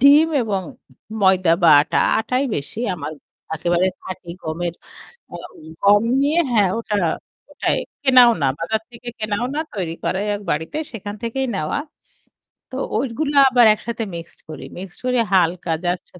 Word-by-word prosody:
ডিম 285 +4 +7 0.2
এবং 200 -4 -1 0.6
ময়দা 190 -3 +4
বা 170 - +6
আটা, 145 - 0 0.2
আটাই 250 +4 0
বেশি। 145 +9 -5 0.2
আমার 155 -3 -6 0.4
একেবারে 175 +3 +1
খাঁটি 185 -2 -8
গমের 170 +2 -3 0.6
আ - - -5 0.5
গম 205 +1 +5 0.2
নিয়ে 295 +4 +2
হ্যাঁ 210 -5 +3
ওটা 215 -2 -3 0.6
ওটাই - - 0 0.3
কেনাও 255 -3 +7
না। 140 - +3
বাজার 220 +6 -1
থেকে 240 +1 -13
কেনাও 215 +2 -1
না - - 0
তৈরি 180 -5 -3
করা 190 - 0 0.2
এক 205 - -7
বাড়িতে 160 - -3
সেখান 205 -3 -6
থেকেই 265 +3 -2
নেওয়া। 155 -5 -1 0.9
তো 260 - -6 0.2
ঐগুলো 275 +5 -2
আবার 245 -2 +5
একসাথে 225 +1 -5
মিক্সড 170 0 -9
করি। 155 -3 -8
মিক্সড 185 -1 -9
করি 250 0 +1 0.2
হালকা 175 -1 +2
জাস্ট 175 0 -1
205 Hz, 150 wpm, -21 LUFS, 175-245 Hz, 0.9 s, ডিম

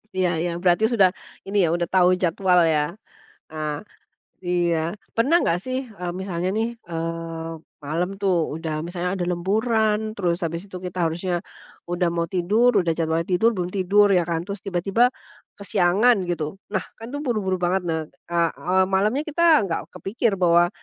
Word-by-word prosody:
Iya 185 -3 0
iya, 175 0 -1
berarti 180 +3 +3
sudah, 195 -5 +5 0.4
ini 200 +1 -1
ya, 170 - +2
udah 175 0 0
tahu 180 -1 +5
jadwal 180 +1 +3
ya? 150 - +2 0.7
Ah, 155 -1 -3 0.7
iya. 175 -1 +1 0.4
Pernah 265 +9 +4
enggak 170 - +1
sih, 255 0 -2 0.2
eee, 175 -1 -3
misalnya 180 -2 -2
nih, 225 +1 +1 0.2
eee, 165 0 -4 0.4
malam 170 +5 -1
tuh 195 -2 +2 0.2
udah 160 -1 -4
misalnya 175 0 -3
ada 185 -2 -2
lemburan, 215 +4 +1 0.2
terus 175 -4 0
habis 165 +1 -3
itu 190 - -9
kita 180 0 -6
harusnya, 175 +3 -2 0.6
udah 175 0 +1
mau 170 0 0
tidur, 210 +7 +3
udah 170 - 0
jadwalnya 165 0 0
tidur 205 +6 +4
belum 180 -2 -3
tidur 200 +2 +4
ya 180 -3 +4
kan, 165 -1 -1
terus 200 0 -5
tiba-tiba 195 +4 0 0.6
kesiangan 200 +3 +3
gitu. 165 +1 -3 0.2
Nah, 190 - +1 0.2
kan 225 - -8
tuh 285 - -3
buru-buru 210 -7 0
banget. 185 +2 +1
Ne 165 - 0 0.4
a - - 0 0.2
eee, 185 +1 +2
malamnya 215 +9 +2
kita 335 +3 -1 0.2
nggak 165 - -2
kepikir 220 +3 -1
bahwa, 175 0 +5
180 Hz, 165 wpm, -23 LUFS, 170-200 Hz, 0.7 s, sudah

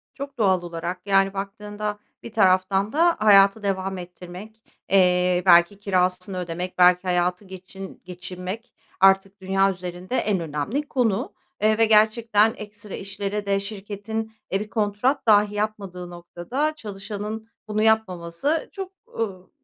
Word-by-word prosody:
Çok 280 0 -8
doğal 190 -5 +3
olarak, 175 +1 -5
yani 195 -1 +3
baktığında 205 +1 -5 0.2
bir 235 - -8
taraftan 190 0 +2
da 335 +3 +4
hayatı 200 0 +6
devam 190 -1 -2
ettirmek, 180 +4 -10 0.3
eee, 180 -1 +3
belki 175 +2 +5
kirasını 185 -1 0
ödemek, 180 +1 -5
belki 180 0 +6
hayatı 180 +1 0
geçin 190 +1 -10
geçinmek 185 +5 -7 0.3
artık 195 +1 +4
dünya 195 +1 +2
üzerinde 180 +4 -6
en 205 -3 +1
önemli 165 - -3
konu. 235 -4 0 0.3
Eee, 215 0 +3
ve 225 - +5
gerçekten 220 0 +4
ekstra 210 -1 -9
işlere 200 +1 -4
de 200 0 +1
şirketin 210 +2 -5 0.2
e, 195 - +1
bir 210 +1 -6
kontrat 215 +5 0
dahi 210 -1 +5
yapmadığı 200 -4 -4
noktada 175 - -3
çalışanın 210 -1 -6 0.2
bunu 215 0 -1
yapmaması 220 - 0
çok, 385 -2 -6 0.3
ııı, 190 -5 -4
195 Hz, 130 wpm, -24 LUFS, 180-215 Hz, 0.3 s, hayatı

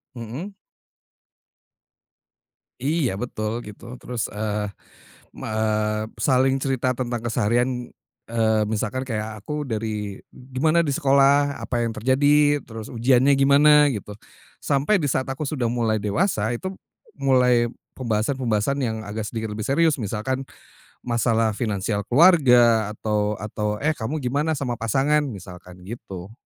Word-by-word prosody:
Hmm. 120 - -6 2.4
Iya 150 -3 +1
betul 110 -3 -3 0.2
gitu 105 - -12 0.2
terus, 120 -3 -4
eee 105 0 -2 0.7
eee, 110 0 -1
saling 130 +3 +2
cerita 130 -2 0
tentang 120 -1 -3
keseharian, 120 +2 0 0.4
eee, 110 -2 +2
misalkan 110 +4 -2
kayak 110 -4 -5
aku 150 +3 -4
dari 105 -3 -4
"Gimana 135 +6 0
di - - +1
sekolah? 140 +1 +3
Apa 120 -1 -2
yang 115 - -1
terjadi?" 145 +5 +3
terus, 110 -1 -8
"Uujiannya 130 +3 +3
gimana?" 145 +2 +5
gitu, 105 -3 -6 0.5
sampai 150 +7 +2
di 145 - +1
saat 130 - -1
aku 135 +3 -4
sudah 135 -5 -1
mulai 115 -2 0
dewasa, 110 - 0
itu 190 +10 -5 0.5
mulai 125 -3 +3 0.2
pembahasan-pembahasan 120 +1 -1
yang 115 -5 -1
agak 105 0 -5
sedikit 110 -1 -4
lebih 105 0 -4
serius, 155 +1 +2
misalkan 120 +5 -3 0.6
masalah 115 -2 +1
finansial 105 -2 -2
keluarga 125 - +5
atau 105 -1 -1
atau, 105 0 -3
"Eh 155 - +3
kamu 135 +3 -4
gimana 145 +3 -1
sama 130 -3 -2
pasangan?" 135 +7 +2
misalkan 90 -4 -10
gitu. 100 -2 -8
120 Hz, 120 wpm, -23 LUFS, 110-135 Hz, 2.4 s, gimana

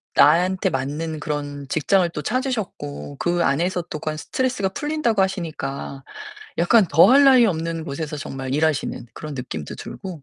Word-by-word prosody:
나한테 180 +6 +4
맞는 150 +3 -3
그런 145 -2 -4
직장을 180 +5 +2
또 150 - -5
찾으셨고 215 - -3
그 175 0 +1
안에서 175 +5 +1
또 155 - -5
그 155 - -3
안 155 - -6
스트레스가 250 +1 -1
풀린다고 265 -3 0
하시니까 155 -7 -3 0.6
약간 190 +4 +5
더할 240 - +7
나위 255 -4 +7
없는 165 -2 -2
곳에서 150 +2 -4
정말 135 -2 -5
일하시는 150 -5 0
그런 150 -2 -7
느낌도 100 - -6
들고. 180 -6 -8
165 Hz, 345 characters per minute, -22 LUFS, 145-190 Hz, 0.6 s, 더할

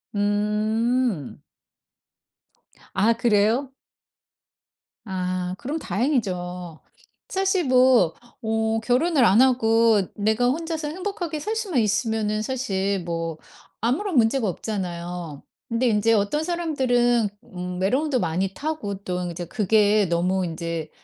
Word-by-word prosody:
음. 210 - 0 1.5
아 215 +4 +3
그래요? 230 +4 +2 1.3
아 185 -2 -3
그럼 295 +9 -4
다행이죠. 180 - -2 0.5
사실 385 -2 +1
뭐 255 -9 +5 0.3
어 220 0 0
결혼을 265 +3 +3
안 210 +3 +5
하고 230 -4 +4
내가 220 +4 +1
혼자서 320 +3 -2
행복하게 355 -1 -4
살 430 +8 -2
수만 400 - 0
있으면은 215 -1 0
사실 200 -6 -1
뭐 165 -1 -3 0.4
아무런 310 - 0
문제가 225 0 +3
없잖아요. 175 -5 -5 0.2
근데 235 +2 0
인제 225 0 +3
어떤 220 +9 +1
사람들은 255 -9 +1 0.3
음 180 0 -5
외로움도 260 +7 +1
많이 185 +1 -1
타고 285 -8 -3
또 180 -1 -3
이제 175 +1 -6
그게 210 +2 +3
너무 180 +2 +1
인제 165 -1 -4
220 Hz, 225 characters per minute, -24 LUFS, 185-260 Hz, 1.5 s, 뭐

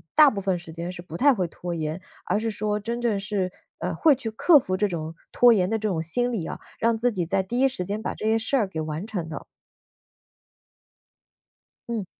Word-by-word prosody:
大 300 -1 +9
部 200 -6 -4
分 185 -2 0
时 165 -2 -11
间 170 +2 -4
是 180 - -8
不 165 -2 -10
太 280 +9 +5
会 185 -7 -1
拖 175 +1 -6
延， 160 +2 -3 0.2
而 - - +1
是 225 +1 -1
说 210 0 -1
真 235 +2 -3
正 230 -4 +1
是， 195 -2 -1 0.3
呃， - - -3
会 315 -3 +5
去 235 -3 -4
克 290 +8 +5
服 185 -6 -2
这 205 +1 +1
种 160 -1 -4 0.2
拖 245 -1 +6
延 185 -3 +2
的 225 0 0
这 215 - -1
种 170 -5 -1
心 245 +10 0
理 180 -8 -2
啊， - - -5 0.2
让 230 0 +2
自 240 0 +1
己 180 -3 -1
在 190 +3 +1
第 240 +7 -2
一 - - +6
时 180 -8 -4
间 205 +3 -3
把 - - -3
这 - - -6
些 220 +1 +3
事 225 +5 0
儿 215 -6 +1
给 160 -4 -4
完 155 +5 -4
成 180 -8 -4
的。 155 - -7 2.4
嗯。 225 -5 -2
205 Hz, 245 characters per minute, -25 LUFS, 175-230 Hz, 2.4 s, 大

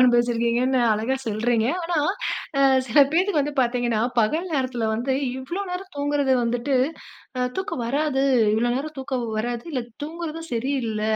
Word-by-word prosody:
அனுபவிச்சிருக்கீங்கன்னு 240 +1 +3
அழகா 225 +5 0
சொல்றீங்க. 225 +1 +1 0.2
ஆனா, 340 0 -1 0.9
சில 250 +4 +2
பேத்துக்கு 360 -1 +2
வந்து 290 +1 -1
பார்த்தீங்கன்னா, 240 -2 +1 0.2
பகல் 305 +11 +2
நேரத்தில 255 -5 -1
வந்து 250 +4 -1 0.2
இவ்ளோ 280 +9 -4
நேரம் 370 +1 -6
தூங்குறது 285 -1 +1
வந்துட்டு, 245 +4 0 0.6
அ - - 0 0.2
தூக்கம் 380 - -3
வராது. 280 +1 0 0.3
இவ்வளோ 240 +2 +1
நேரம் 300 +3 -4
தூக்கம் 260 -2 -2
வராது. 240 +1 -2
இல்ல 255 -3 -1 0.2
தூங்குறதும் 330 +1 -6
சரியில்ல, 235 -3 -1
260 Hz, 135 wpm, -24 LUFS, 235-295 Hz, 0.9 s, அனுபவிச்சிருக்கீங்கன்னு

